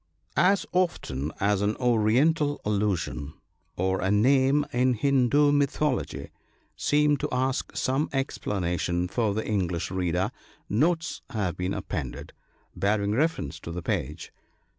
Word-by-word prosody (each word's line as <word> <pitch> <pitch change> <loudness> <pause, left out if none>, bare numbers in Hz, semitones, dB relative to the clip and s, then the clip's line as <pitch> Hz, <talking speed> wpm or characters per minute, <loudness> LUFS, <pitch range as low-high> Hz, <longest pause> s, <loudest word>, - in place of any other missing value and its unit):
As 195 +2 +3
often 80 - -1
as 100 0 +2
an 105 +1 +1
Oriental 130 +6 +2
allusion, 100 -8 -1 0.4
or 95 +1 0
a 95 - 0
name 135 +7 +4
in 125 +1 +2
Hindoo 140 +3 +3
mythology, 145 -1 0 0.4
seemed 145 -1 +2
to - - -2
ask 130 +1 -1
some 135 +4 0
explanation 90 -9 -1
for 105 +1 0
the 110 - -2
English 90 -5 -1
reader, 95 +2 0 0.4
notes 165 - 0
have 105 -9 -2
been 90 +2 -2
appended, - - -5 0.4
bearing 100 0 +1
refe 155 +9 +2
rence 80 +4 -6
to 85 - -7
the 85 0 -5
page. 75 +2 -3
110 Hz, 125 wpm, -27 LUFS, 95-140 Hz, 0.4 s, name